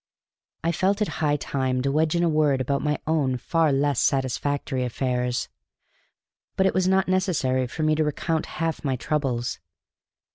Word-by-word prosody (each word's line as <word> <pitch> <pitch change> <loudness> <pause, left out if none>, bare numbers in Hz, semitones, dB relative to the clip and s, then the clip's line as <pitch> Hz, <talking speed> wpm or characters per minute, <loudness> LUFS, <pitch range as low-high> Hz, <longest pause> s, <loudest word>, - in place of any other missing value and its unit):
I 165 - +2
felt 195 +4 +1
it - - -2
high 145 -1 +3
time 130 -3 -1
to 140 - +1
wedge 155 +2 +1
in 170 - +2
a - - +3
word 150 -4 +2
about 140 +2 0
my 150 0 0
own 145 -5 +1
far 165 +3 +1
less 140 -1 +1
satisfactory 135 0 0
affairs. 125 0 -1 1.1
But 190 - +2
it 190 - +3
was 185 -1 +2
not 190 0 +3
necessary 160 -9 +1
for 155 +6 -4
me 155 0 +3
to 155 0 +2
recount 160 +1 -1
half 165 -1 -2
my 135 -3 0
troubles. 130 -3 -2
145 Hz, 170 wpm, -25 LUFS, 130-160 Hz, 1.1 s, high